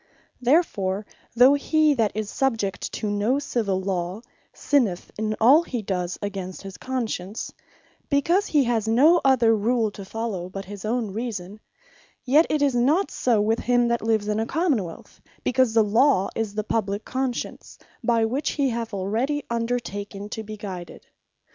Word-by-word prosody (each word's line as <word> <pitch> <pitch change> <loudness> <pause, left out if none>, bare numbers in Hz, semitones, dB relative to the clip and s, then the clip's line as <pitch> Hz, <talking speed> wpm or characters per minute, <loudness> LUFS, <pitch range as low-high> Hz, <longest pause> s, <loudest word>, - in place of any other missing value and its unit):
Therefore, 215 - +1 0.3
though 250 +4 +7
he 305 +1 +3
that 225 -6 +1
is 215 -1 -2
subject 225 -8 -1
to 215 - -3
no 210 +6 +1
Civill 215 -9 -1
Law, 185 +1 -3 0.3
sinneth 230 -11 0
in 215 0 -2
all 265 +8 +7
he 250 -9 -4
does 180 -2 -2
against 195 -2 -5
his 195 -1 -8
Conscience, 225 -6 -4 0.6
because 340 +8 +2
he 295 -3 +3
has 230 -3 0
no 295 +10 +5
other 240 -4 +4
rule 220 +1 +1
to 200 - -9
follow 195 -3 -4
but 195 +1 -7
his 205 +1 -8
own 225 -2 -1
reason; 210 -3 -5 0.6
yet 295 +6 +4
it 300 -1 +1
is 280 -2 +2
not 285 +11 +2
so 235 -4 +1
with 220 +2 +1
him 245 -1 +2
that 235 0 0
lives 220 -2 0
in 210 0 0
a 225 - -1
Common 305 - +1
wealth; 165 -2 -11 0.2
because 250 -3 +2
the 225 - +6
Law 210 -1 +3
is 220 -2 -3
the 215 - -1
publique 205 -1 -2
Conscience, 260 -1 -4 0.3
by 230 -2 +2
which 260 +7 -1
he 280 -3 +1
hath 230 -2 -4
already 235 +10 -1
undertaken 210 -4 -3
to 220 - -5
be 215 0 -8
guided. 185 -4 -8
225 Hz, 165 wpm, -24 LUFS, 205-260 Hz, 0.6 s, though